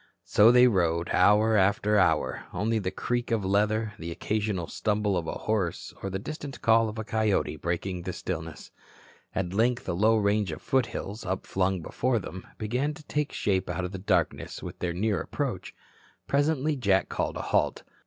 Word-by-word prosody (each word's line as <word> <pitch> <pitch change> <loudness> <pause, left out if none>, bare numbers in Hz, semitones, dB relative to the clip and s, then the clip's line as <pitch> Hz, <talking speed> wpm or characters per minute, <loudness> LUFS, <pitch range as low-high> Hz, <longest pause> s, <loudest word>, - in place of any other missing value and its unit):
So 110 +3 +6
they 125 0 +7
rode 85 -6 +1
hour 105 +4 +5
after 100 +1 +3
hour, 95 -4 +2
only 110 +4 0
the 95 -3 -2
creak 120 +5 -2
of 110 -4 0
leather, 105 +2 +1
the 85 - -5
occasional 105 0 -2
stumble 105 +2 0
of 85 -2 -2
a - - -2
horse 100 -6 -1
or 100 - -3
the 95 - -2
distant 140 +4 -7
call 115 0 +4
of 105 - -8
a 110 - -3
coyote 110 -7 0
breaking 85 +3 -3
the 90 - -4
stillness. 80 -3 -6 0.6
At 95 -1 -2
length 120 +4 +1
a 90 - 0
low 110 +5 +3
range 100 -3 +1
of 80 - -8
foothills, 115 -4 -1
upflung 95 -1 -1
before 130 +7 0
them, 95 -3 -7
began 125 +8 -1
to 155 - -13
take 150 0 -1
shape 95 -3 0
out 90 +1 -2
of 90 - -5
the 95 - -6
darkness 95 - -1
with - - -7
their 90 - -1
near 105 +3 0
approach. - - -4 0.5
Presently 145 +1 +1
Jack 100 -7 +2
called - - -2
a - - -3
halt. - - 0
105 Hz, 180 wpm, -27 LUFS, 95-115 Hz, 0.6 s, they